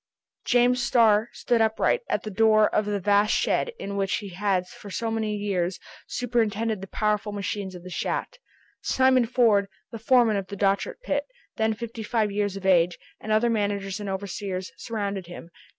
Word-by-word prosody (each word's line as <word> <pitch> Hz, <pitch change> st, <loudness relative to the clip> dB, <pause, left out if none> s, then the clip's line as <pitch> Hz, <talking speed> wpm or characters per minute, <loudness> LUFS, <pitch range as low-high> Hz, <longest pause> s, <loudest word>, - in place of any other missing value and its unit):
James 245 Hz, 0 st, +3 dB
Starr 225 Hz, -3 st, +4 dB
stood 235 Hz, -2 st, 0 dB
upright, 220 Hz, -, +2 dB
at -, -, 0 dB
the 215 Hz, -, -5 dB
door 215 Hz, +1 st, +4 dB
of 210 Hz, -, +1 dB
the 205 Hz, -1 st, -1 dB
vast 205 Hz, +2 st, +3 dB
shed 480 Hz, -, +1 dB
in 200 Hz, 0 st, -5 dB
which 195 Hz, -1 st, 0 dB
he 205 Hz, -2 st, -5 dB
had 190 Hz, 0 st, 0 dB
for 205 Hz, -, -12 dB
so 225 Hz, +3 st, -2 dB
many 220 Hz, -1 st, -1 dB
years 190 Hz, -3 st, -1 dB, 0.3 s
superintended 225 Hz, -3 st, -1 dB
the 195 Hz, -, -7 dB
powerful 210 Hz, +1 st, -1 dB
machines 200 Hz, -1 st, -4 dB
of 175 Hz, -, -10 dB
the 185 Hz, -, -9 dB
shaft. -, -, -3 dB, 0.4 s
Simon 260 Hz, -2 st, +3 dB
Ford, 225 Hz, -5 st, +3 dB, 0.2 s
the 230 Hz, -, -7 dB
foreman 230 Hz, -2 st, +4 dB
of 195 Hz, -1 st, -4 dB
the 200 Hz, -, -7 dB
Dochart 200 Hz, -, 0 dB
pit, -, -, -1 dB, 0.3 s
then 220 Hz, 0 st, +1 dB
fifty 230 Hz, 0 st, -7 dB
five 215 Hz, -1 st, 0 dB
years 205 Hz, -1 st, -1 dB
of 195 Hz, -, -8 dB
age, 175 Hz, -2 st, +4 dB, 0.2 s
and 215 Hz, -, -5 dB
other 225 Hz, +2 st, +3 dB
managers 200 Hz, -2 st, -1 dB
and 205 Hz, -1 st, -5 dB
overseers, 190 Hz, -1 st, -4 dB
surrounded 200 Hz, -2 st, -4 dB
him. 175 Hz, -1 st, -10 dB
210 Hz, 180 wpm, -25 LUFS, 195-225 Hz, 0.4 s, Starr